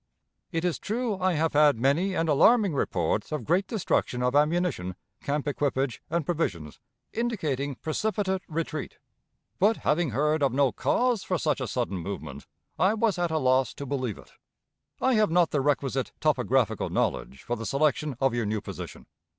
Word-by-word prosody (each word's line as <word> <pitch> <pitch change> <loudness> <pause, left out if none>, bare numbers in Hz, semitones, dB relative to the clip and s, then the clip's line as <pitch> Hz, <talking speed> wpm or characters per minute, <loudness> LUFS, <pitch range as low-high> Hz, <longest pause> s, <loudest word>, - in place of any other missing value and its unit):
"It 165 0 -1
is 175 - 0
true 220 -2 -2
I 185 0 +2
have 160 0 0
had 150 -3 +5
many 150 - +1
and 165 - 0
alarming 200 - +4
reports 95 - -1
of 150 - -2
great 180 +5 +1
destruction 150 - -1
of 125 +2 +1
ammunition, 150 - +1 0.3
camp 145 +1 -2
equipage, 135 -3 -1
and 170 -3 -1
provisions, 95 - -2 0.3
indicating 155 - -2
precipitate 190 - -1
retreat; 155 -2 -4 0.6
but, 215 +4 +4
having 160 0 +1
heard 150 +6 +1
of 135 -3 +2
no 135 -1 +3
cause 245 -4 +1
for 185 - -1
such 150 -3 0
a 130 - -2
sudden 105 -4 -2
movement, 80 -6 -7 0.3
I 195 +4 +3
was 220 -4 +1
at 175 -1 +1
a 160 - 0
loss 130 -3 +2
to 140 - -6
believe 130 -6 -2
it. - - -15 0.7
"I 260 - +2
have 215 -2 +3
not 170 0 +3
the 145 - +1
requisite 135 -2 0
topographical 125 -6 +1
knowledge 65 - -2
for 120 - -2
the 115 -1 -5
selection 150 0 +1
of 135 -2 +2
your 120 -3 -1
new 105 +1 -1
position. - - -8
150 Hz, 170 wpm, -27 LUFS, 130-180 Hz, 0.7 s, had